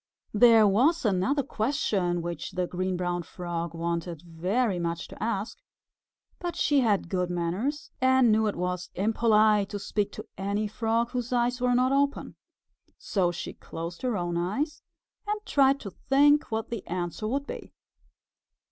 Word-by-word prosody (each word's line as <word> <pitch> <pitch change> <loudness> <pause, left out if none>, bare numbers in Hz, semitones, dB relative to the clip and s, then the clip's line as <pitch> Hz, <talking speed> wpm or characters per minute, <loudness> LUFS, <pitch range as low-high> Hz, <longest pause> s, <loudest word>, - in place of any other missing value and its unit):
There 225 0 +7
was 260 - +3
another 210 +8 +2
question 205 - -1
which 170 0 -5
the 180 0 0
Green 185 +1 -2
Brown 175 0 -1
Frog 170 -1 -5
wanted 170 -1 -3
very 180 +5 -1
much 170 0 -3
to - - -8
ask, 215 -1 -2 0.8
but 350 -1 -4
she 290 -1 +3
had 210 -8 +2
good 180 0 -1
manners 180 - -2
and 260 -2 +5
knew 220 +1 +3
that 210 - -1
it - - -10
was 180 0 -3
impolite 215 0 +3
to 205 - -4
speak 205 0 -2
to - - -7
any 200 +2 -1
Frog 230 +2 0
whose 245 -1 -3
eyes 245 0 +1
were 250 0 +3
not 255 +1 +3
open. 280 +1 0 0.6
So 185 -4 0
she 175 0 -6
closed 170 +1 -7
her 245 -4 0
own 175 -1 -2
eyes 275 - -2 0.5
and 420 0 -1
tried 275 -4 +3
to 200 - -7
think 290 +7 +3
what 220 +1 -3
the 230 -4 -4
answer 175 +4 -3
would 275 +5 -1
be. - - -8
210 Hz, 160 wpm, -27 LUFS, 175-250 Hz, 0.8 s, There